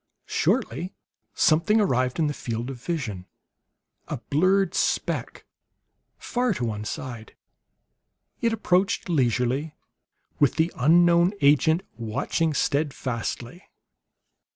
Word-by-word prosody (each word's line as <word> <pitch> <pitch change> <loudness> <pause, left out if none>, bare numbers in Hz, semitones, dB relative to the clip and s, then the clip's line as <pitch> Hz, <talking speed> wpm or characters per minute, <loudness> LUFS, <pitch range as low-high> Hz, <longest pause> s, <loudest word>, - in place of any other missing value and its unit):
Shortly 170 +11 -1 0.4
something 175 +8 +3
arrived 130 - +1
in 165 - +2
the 150 - -1
field 120 0 -4
of 125 -3 -10
vision; 115 - -4 0.8
a - - -3
blurred 185 +4 +1
speck, - - -1 0.7
far 245 -4 -1
to 125 - -2
one 105 -2 -4
side. 120 -4 -7 1.1
It 230 - +2
approached 200 -2 +1
leisurely, 130 +1 0 0.6
with 145 -4 +3
the 165 +2 +1
unknown 170 +5 +4
agent 155 +5 +4
watching 120 +8 -1
steadfastly. 135 - -2
150 Hz, 100 wpm, -25 LUFS, 125-175 Hz, 1.1 s, unknown